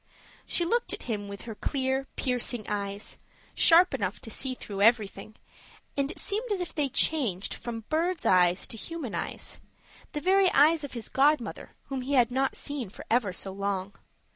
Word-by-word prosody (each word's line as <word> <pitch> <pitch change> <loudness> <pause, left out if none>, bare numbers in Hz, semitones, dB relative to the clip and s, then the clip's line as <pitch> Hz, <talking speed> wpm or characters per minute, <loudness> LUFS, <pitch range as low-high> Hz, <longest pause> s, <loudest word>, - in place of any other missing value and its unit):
She 345 - +3
looked 470 +7 +1
at - - -5
him 205 -3 -3
with 200 0 -8
her 230 - -6
clear, 265 +3 -1
piercing 245 -3 -1
eyes, 200 0 -4 0.3
sharp 350 +1 +6
enough 200 -7 -2
to 225 - -8
see 260 +3 -2
through 200 -5 -6
everything, 215 -1 +2 0.6
and 280 0 0
it - - -6
seemed 435 +3 -1
as 400 - 0
if 350 -3 -4
they 290 -3 0
changed 230 - +1
from 230 -2 -6
bird's 330 +2 0
eyes 180 0 +4
to 225 - -6
human 315 -1 -5
eyes - - -5 0.5
the 300 - -2
very 380 +3 +4
eyes 305 +2 +5
of 285 - -6
his 235 -3 -4
godmother, 280 -2 +1
whom 270 -1 -2
he 270 +3 -3
had 245 -3 +4
not 265 +1 0
seen 285 -8 -4
for - - -11
ever 230 -5 +3
so 190 +1 -6
long. 195 0 -3
250 Hz, 180 wpm, -28 LUFS, 205-300 Hz, 0.6 s, sharp